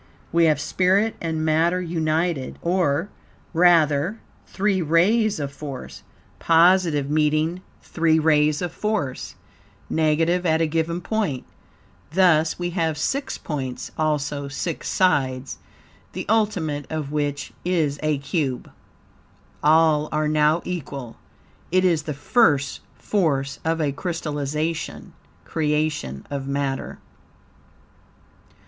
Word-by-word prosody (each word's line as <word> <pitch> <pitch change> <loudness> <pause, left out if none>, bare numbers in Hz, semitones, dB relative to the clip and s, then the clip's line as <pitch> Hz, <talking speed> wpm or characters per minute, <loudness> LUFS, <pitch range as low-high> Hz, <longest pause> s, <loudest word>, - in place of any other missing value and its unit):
We 170 0 +4
have 155 -3 +3
spirit 190 +7 +1
and 160 -1 -2
matter 165 +3 +2
united, 160 -3 -1
or, 170 -1 +1 0.4
rather, 170 +2 +3 0.3
three 195 -1 0
rays 195 +6 +2
of 140 -1 -3
force, 140 -3 -8 0.4
positive, 165 -3 +4
meeting 155 +3 +1 0.2
three 160 -1 +2
rays 150 0 +3
of 175 - -3
force, 210 -12 -3 0.6
negative, 165 +3 +2
at 160 -2 +2
a 165 - +3
given 165 +2 -1
point. 190 - -2 0.7
Thus 165 -4 +3
we 175 0 -3
have 165 -3 -1
six 275 - -2
points, 130 -5 -5
also 145 -2 -1
six 145 +4 -4
sides, 135 -8 +1 0.5
the - - -5
ultimate 185 -10 0
of 155 -3 -3
which 145 -1 -2
is 160 -6 0
a 155 -1 +1
cube. 140 -3 -3 0.9
All 155 0 +4
are 155 0 0
now 155 +2 +2
equal. 140 -9 -6 0.5
It 185 +1 +3
is 170 -4 +3
the 150 -1 -5
first 145 - +2 0.2
force 140 -9 -1
of 165 0 0
a 150 -3 +1
crystallization 155 0 -3 0.3
(creation) 150 - -1
of 140 -1 -4
matter. 140 -1 -2
155 Hz, 110 wpm, -23 LUFS, 145-175 Hz, 0.9 s, We